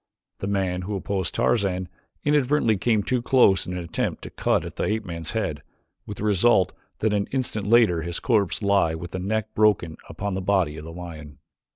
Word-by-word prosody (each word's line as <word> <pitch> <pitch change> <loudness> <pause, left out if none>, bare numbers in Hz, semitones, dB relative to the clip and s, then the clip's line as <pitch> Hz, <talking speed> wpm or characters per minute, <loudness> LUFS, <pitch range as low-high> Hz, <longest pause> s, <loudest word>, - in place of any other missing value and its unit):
The 95 - -3
man 95 -2 -1
who 100 +3 -4
opposed 95 -1 -2
Tarzan 95 -5 +1 0.4
inadvertently 145 -5 +3
came 110 +1 +1
too 125 +2 0
close 120 -6 +4
in 90 - -4
an 90 -1 -4
attempt 85 - -3
to - - -8
cut - - 0
at - - -8
the - - 0
ape 110 0 -1
man's 85 -1 -5
head, 100 -10 -2 0.5
with 105 - -6
the - - -5
result 105 -2 +3 0.3
that 110 -1 +2
an 100 -1 0
instant 115 -6 -3
later 110 -7 +4
his 85 +1 -3
corpse 105 -4 +1
lay 100 -5 +3
with 85 +1 -7
the 95 - -4
neck 110 +3 -2
broken 100 -7 +2
upon 100 0 -4
the 95 - -2
body 90 -5 +1
of 75 0 -8
the 80 - -8
lion. 80 -4 -9
100 Hz, 200 wpm, -24 LUFS, 90-110 Hz, 0.5 s, close